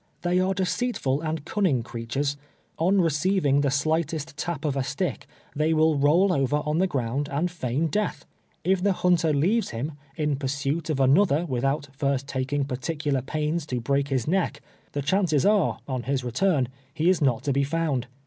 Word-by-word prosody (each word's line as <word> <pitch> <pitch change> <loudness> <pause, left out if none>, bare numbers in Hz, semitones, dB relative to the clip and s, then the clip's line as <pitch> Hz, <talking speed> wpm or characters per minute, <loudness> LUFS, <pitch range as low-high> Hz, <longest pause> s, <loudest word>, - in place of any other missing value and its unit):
They 175 +1 +2
are 190 +1 +1
deceitful 185 - -1
and 155 -2 -3
cunning 175 - +1
creatures. 120 +5 -3 0.4
On 185 +5 +3
receiving 160 -3 +2
the 140 - +2
slightest 155 +2 -1
tap 160 0 -4
of 145 -2 0
a 135 - 0
stick, 140 +5 -3 0.3
they 155 +2 +2
will 155 0 +4
roll 165 +7 +4
over 145 0 +1
on 150 +2 0
the 190 - +3
ground 140 -1 -2
and 160 +5 0
feign 145 -2 -1
death. 165 -2 -2 0.4
If 185 +1 +2
the 200 0 +3
hunter 175 -3 +2
leaves 185 +11 +2
him, 125 +7 -4 0.3
in 150 -2 0
pursuit 140 +3 -2
of 155 - 0
anoth 140 +9 +4
er, - - -4
without 135 +1 -1
first 140 -1 0
taking 135 +1 -1
particular 140 +1 -2
pains 155 +3 -2
to 125 -3 -2
break 140 +3 0
his 130 -4 -1
neck, 185 +2 0 0.3
the 145 - -2
chances 165 -2 +2
are, 205 -3 +3
on 130 -3 -2
his 135 +1 -1
return, 130 +1 +1 0.2
he 160 +3 -1
is 185 -2 +3
not 130 -5 +2
to 140 - 0
be 140 +1 +2
f(jund. 145 -4 -1
150 Hz, 180 wpm, -25 LUFS, 135-170 Hz, 0.4 s, will